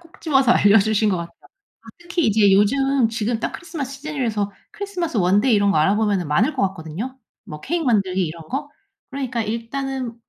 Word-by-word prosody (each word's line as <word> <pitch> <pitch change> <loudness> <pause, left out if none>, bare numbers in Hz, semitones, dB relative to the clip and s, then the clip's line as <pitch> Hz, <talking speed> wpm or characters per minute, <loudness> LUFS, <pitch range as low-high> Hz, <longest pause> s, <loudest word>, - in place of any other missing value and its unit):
콕 335 -1 -20
집어서 270 -6 +3
알려주신 210 0 +4
것 185 - +1
같아요. 170 0 -7 0.7
특히 345 -2 -1
이제 210 -2 +4
요즘 260 +5 +3
지금 225 0 -2
딱 - - -2
크리스마스 280 -6 -6
시즌이라서 245 -9 -3 0.2
크리스마스 365 - -4
원데이 200 +7 +3
이런거 200 -1 +2
알아보면은 195 +1 +1
많을 220 - +2
것 - - -1
같거든요? 190 +9 -7 0.3
뭐 150 0 -9
케이크 330 - -2
만들기 190 -6 +1
이런 160 0 -9
거. 285 +3 -4 0.4
그러니까 255 -4 -3
일단은 245 +3 -4
230 Hz, 415 characters per minute, -21 LUFS, 200-275 Hz, 0.7 s, 알려주신